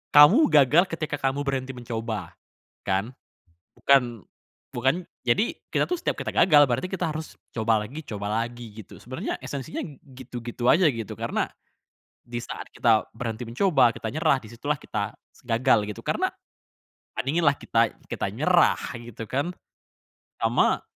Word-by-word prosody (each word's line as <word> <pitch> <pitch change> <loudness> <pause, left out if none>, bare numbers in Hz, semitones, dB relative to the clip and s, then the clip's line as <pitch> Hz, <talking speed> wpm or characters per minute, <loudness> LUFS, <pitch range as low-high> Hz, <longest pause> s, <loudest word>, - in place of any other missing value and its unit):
kamu 180 - +9
gagal 150 +3 +6
ketika 155 -3 -2
kamu 135 0 -1
berhenti 135 -1 -1
mencoba, 115 -6 -5 0.5
kan? 100 +5 -1 0.6
Bukan, 125 -6 +3 0.5
bukan 155 +7 +1 0.2
jadi 125 - +1 0.2
kita - - +2
tuh 360 -1 -2
setiap - - -1
kita - - -3
gagal, 150 -5 +6
berarti 130 +8 -1
kita 185 -4 -2
harus 155 +1 -7 0.2
coba 110 -2 +1
lagi, 140 +9 -7
coba 105 -6 -4
lagi 120 -1 -7
gitu. - - -15
Sebenarnya 130 +2 -4
esensinya 140 +3 -5 0.4
gitu-gitu 120 -2 -5
aja 175 0 +5
gitu, 115 -5 -5
karena - - 0 0.8
disaat 120 0 -6
kita 115 -3 +3
berhenti 115 0 -4
mencoba, 130 - +3
kita - - -5
nyerah, 150 -2 +3
disitulah 120 +7 -3
kita 105 -1 -3 0.3
gagal 115 -1 +3
gitu, - - -11
karena, - - +1 0.9
bandinginlah 145 +1 +2
kita 115 0 +1 0.2
kita - - -1
nyerah - - +3 0.2
gitu 115 -1 -8
kan 140 +9 -1 0.9
sama - - +3
125 Hz, 135 wpm, -25 LUFS, 115-145 Hz, 0.9 s, kamu